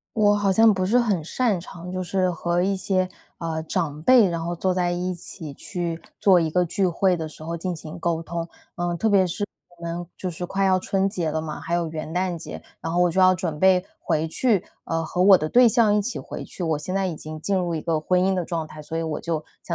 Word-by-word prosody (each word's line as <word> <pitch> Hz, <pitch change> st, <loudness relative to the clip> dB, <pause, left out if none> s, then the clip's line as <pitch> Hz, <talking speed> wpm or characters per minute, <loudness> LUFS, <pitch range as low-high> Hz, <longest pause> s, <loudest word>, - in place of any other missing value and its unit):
我 205 Hz, -1 st, +4 dB
好 200 Hz, -2 st, +2 dB
像 220 Hz, +1 st, +6 dB
不 185 Hz, -, -1 dB
是 225 Hz, +7 st, +3 dB
很 205 Hz, -9 st, +1 dB
擅 220 Hz, +3 st, +1 dB
长 175 Hz, 0 st, -9 dB
就 185 Hz, 0 st, -3 dB
是 185 Hz, 0 st, +1 dB
和 175 Hz, +1 st, 0 dB
一 195 Hz, +1 st, +1 dB
些， 185 Hz, -1 st, 0 dB, 0.3 s
呃， 160 Hz, -1 st, -3 dB
长 155 Hz, -3 st, -2 dB
辈， 235 Hz, +1 st, +6 dB
然 170 Hz, -1 st, -3 dB
后 175 Hz, +1 st, -2 dB
坐 185 Hz, +2 st, 0 dB
在 180 Hz, -1 st, +1 dB
一 180 Hz, +1 st, -2 dB
起 165 Hz, -3 st, -8 dB
去 175 Hz, -4 st, -4 dB, 0.2 s
做 190 Hz, -3 st, +6 dB
一 165 Hz, -2 st, +1 dB
个 180 Hz, +2 st, +2 dB
聚 190 Hz, +3 st, +1 dB
会 180 Hz, +1 st, +2 dB
的 160 Hz, -2 st, -4 dB
时 155 Hz, 0 st, -11 dB
候 170 Hz, +1 st, -4 dB
进 180 Hz, +2 st, -3 dB
行 160 Hz, +1 st, -9 dB
沟 165 Hz, -1 st, -1 dB
通。 165 Hz, 0 st, -4 dB, 0.3 s
呃， 175 Hz, 0 st, -1 dB
特 220 Hz, -, +1 dB
别 195 Hz, -3 st, +4 dB
是 205 Hz, +4 st, -3 dB, 0.3 s
我 -, -, -16 dB
们 170 Hz, +1 st, -4 dB
就 185 Hz, -, -4 dB
是 175 Hz, +1 st, -6 dB
快 195 Hz, +2 st, -1 dB
要 185 Hz, -1 st, +4 dB
春 195 Hz, +1 st, 0 dB
节 175 Hz, -6 st, -2 dB
了 160 Hz, +1 st, -1 dB
嘛， 155 Hz, -1 st, -5 dB
还 170 Hz, -, -6 dB
有 170 Hz, -1 st, 0 dB
元 155 Hz, 0 st, -6 dB
旦 180 Hz, -1 st, 0 dB
节， -, -, -8 dB, 0.2 s
然 165 Hz, -, -3 dB
后 175 Hz, -, +2 dB
我 175 Hz, -1 st, +4 dB
就 190 Hz, -, -3 dB
要 185 Hz, 0 st, +6 dB
准 165 Hz, -4 st, -3 dB
备 185 Hz, +1 st, +4 dB
回 155 Hz, +1 st, 0 dB
去 210 Hz, +2 st, +2 dB, 0.2 s
呃， 165 Hz, 0 st, -1 dB
和 180 Hz, +3 st, -1 dB
我 195 Hz, -1 st, +8 dB
的 155 Hz, -, -2 dB
对 245 Hz, +8 st, +6 dB
象 225 Hz, -3 st, +4 dB
一 210 Hz, -, +2 dB
起 230 Hz, +4 st, -3 dB
回 -, -, -7 dB
去。 -, -, -8 dB
我 160 Hz, -3 st, 0 dB
现 185 Hz, +5 st, -5 dB
在 195 Hz, -1 st, +1 dB
已 170 Hz, -, -3 dB
经 155 Hz, +1 st, -8 dB
进 195 Hz, +4 st, 0 dB
入 175 Hz, -2 st, 0 dB
一 160 Hz, -, -2 dB
个 165 Hz, 0 st, 0 dB
婚 180 Hz, +4 st, +1 dB
姻 190 Hz, +1 st, +2 dB
的 180 Hz, -2 st, -1 dB
状 165 Hz, -2 st, -3 dB
态， 155 Hz, -1 st, -10 dB
所 160 Hz, +2 st, -5 dB
以 -, -, -1 dB
我 160 Hz, -2 st, -2 dB
就 165 Hz, -2 st, -2 dB, 0.2 s
想 170 Hz, -, -3 dB
175 Hz, 280 characters per minute, -24 LUFS, 165-190 Hz, 0.3 s, 我